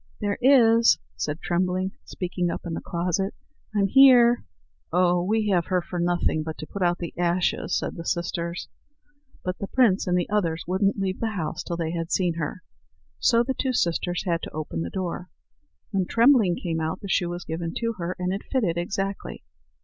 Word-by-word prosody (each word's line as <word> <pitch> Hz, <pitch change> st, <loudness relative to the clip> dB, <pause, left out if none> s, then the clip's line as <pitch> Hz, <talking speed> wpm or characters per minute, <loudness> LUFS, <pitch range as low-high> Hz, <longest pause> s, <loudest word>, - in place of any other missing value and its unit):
"There 205 Hz, -1 st, -2 dB
is," 235 Hz, -3 st, +6 dB, 0.2 s
said 150 Hz, +2 st, -3 dB
Trembling, 185 Hz, +2 st, 0 dB
speaking 180 Hz, -1 st, -2 dB
up -, -, -5 dB
in 170 Hz, -, -4 dB
the -, -, -4 dB
closet; 180 Hz, +3 st, -1 dB, 0.4 s
"I'm 200 Hz, -1 st, +3 dB
here." 245 Hz, +1 st, +6 dB, 0.5 s
"Oh! 175 Hz, 0 st, +3 dB
we 215 Hz, +2 st, +1 dB
have 175 Hz, -4 st, +2 dB
her 185 Hz, -1 st, +2 dB
for 175 Hz, 0 st, -5 dB
nothing 175 Hz, -2 st, +1 dB
but 160 Hz, 0 st, -5 dB
to -, -, -7 dB
put 200 Hz, -, -7 dB
out 175 Hz, -1 st, +2 dB
the 170 Hz, -, -6 dB
ashes," 175 Hz, +1 st, +1 dB
said -, -, -3 dB
the 170 Hz, -, -6 dB
sisters. 170 Hz, 0 st, -3 dB, 0.8 s
But 180 Hz, 0 st, -3 dB
the 200 Hz, -, -4 dB
prince 215 Hz, -7 st, +3 dB
and 180 Hz, 0 st, +2 dB
the 175 Hz, -, 0 dB
others 170 Hz, -6 st, 0 dB
wouldn't 195 Hz, +3 st, +1 dB
leave 190 Hz, -1 st, -2 dB
the 220 Hz, -2 st, -2 dB
house 155 Hz, -3 st, -3 dB
till 170 Hz, -, -4 dB
they 165 Hz, -1 st, -2 dB
had 165 Hz, 0 st, -4 dB
seen 180 Hz, -3 st, +2 dB
her; 165 Hz, +4 st, -4 dB, 0.6 s
so 235 Hz, -1 st, +4 dB
the 265 Hz, +2 st, -1 dB
two 260 Hz, 0 st, -1 dB
sisters 175 Hz, -3 st, 0 dB
had 170 Hz, -2 st, 0 dB
to -, -, -7 dB
open 150 Hz, -, -4 dB
the 85 Hz, -, -3 dB
door. 180 Hz, -, -4 dB, 0.6 s
When 190 Hz, -3 st, 0 dB
Trembling 230 Hz, -7 st, +4 dB
came 165 Hz, -3 st, -3 dB
out, 160 Hz, 0 st, -3 dB
the 200 Hz, -, -6 dB
shoe 180 Hz, -2 st, +1 dB
was 175 Hz, 0 st, -6 dB
given 165 Hz, +1 st, -3 dB
to 230 Hz, -1 st, -1 dB
her, 175 Hz, +1 st, -3 dB
and 180 Hz, 0 st, -1 dB
it 200 Hz, -, -3 dB
fitted 195 Hz, -11 st, +1 dB
exactly. 195 Hz, +2 st, -4 dB
180 Hz, 195 wpm, -25 LUFS, 170-200 Hz, 0.8 s, is